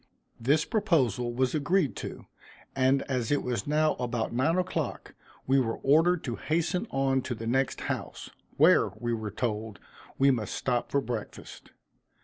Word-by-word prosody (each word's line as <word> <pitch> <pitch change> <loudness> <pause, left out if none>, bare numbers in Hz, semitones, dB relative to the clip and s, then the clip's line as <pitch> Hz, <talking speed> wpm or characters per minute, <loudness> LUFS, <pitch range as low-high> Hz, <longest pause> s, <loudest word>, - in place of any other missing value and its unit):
This 145 +6 +2
proposal 135 - +1
was 125 +1 0
agreed 155 +1 +1
to, - - -7 0.5
and 135 +1 +3
as 125 -4 -2
it 145 - +1
was 120 -3 -2
now 155 +1 +2
about 120 -2 -2
nine 145 +8 +2
o'clock, 185 0 -3 0.3
we 135 +1 +3
were 115 -3 -1
ordered 165 +5 +3
to 120 -4 -4
hasten 170 +6 -1
on 135 -1 +1
to 125 - -4
the 115 - -7
next 130 +3 0
house, - - -5 0.3
where, - - +5
we 120 +2 -2
were 110 -2 -3
told, 110 -1 -3 0.4
we 135 +1 +5
must 110 -6 -2
stop 125 -2 -1
for 140 - +1
breakfast. 115 -4 -7
130 Hz, 155 wpm, -28 LUFS, 120-150 Hz, 0.5 s, where